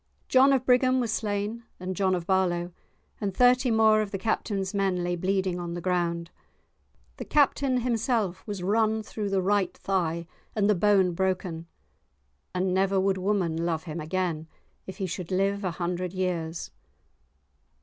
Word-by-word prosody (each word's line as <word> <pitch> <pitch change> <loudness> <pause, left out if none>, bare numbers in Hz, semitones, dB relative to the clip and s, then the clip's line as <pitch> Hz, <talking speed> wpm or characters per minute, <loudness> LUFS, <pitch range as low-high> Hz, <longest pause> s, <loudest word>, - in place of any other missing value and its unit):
John 265 +2 +5
of 260 -2 +2
Brigham 255 0 +4
was 235 -3 -1
slain, 210 +2 -2 0.2
and 185 +1 -4
John 190 -1 +2
of 175 -2 -4
Barlow, 180 -2 +1 0.5
and 195 -3 -3
thirty 250 +1 +5
more 220 -1 +4
of 210 - -3
the 195 - -3
Captain's 195 -2 -2
men 190 -3 0
lay 175 0 -1
bleeding 185 0 0
on 170 -1 -4
the - - -3
ground. 170 -1 -1 0.9
The - - -6
Captain 275 -3 +2
himself 230 -5 0
was 200 -4 -4
run 220 +2 +1
through 210 -1 -4
the 195 -1 +1
right 200 0 +1
thigh 170 -3 -1 0.3
and 205 -2 +2
the 210 - +5
bone 190 -1 +3
broken, 180 -2 -2 0.9
and 185 0 0
never 195 +1 +2
would 190 0 +1
woman 180 -4 0
love 165 -2 -1
him 165 -1 -6
again, 160 -1 -2 0.4
if 190 - -7
he 195 - -2
should 180 -1 -5
live 195 +2 0
a 185 - 0
hundred 175 +1 -3
years. 175 -3 -3
190 Hz, 160 wpm, -27 LUFS, 175-210 Hz, 0.9 s, John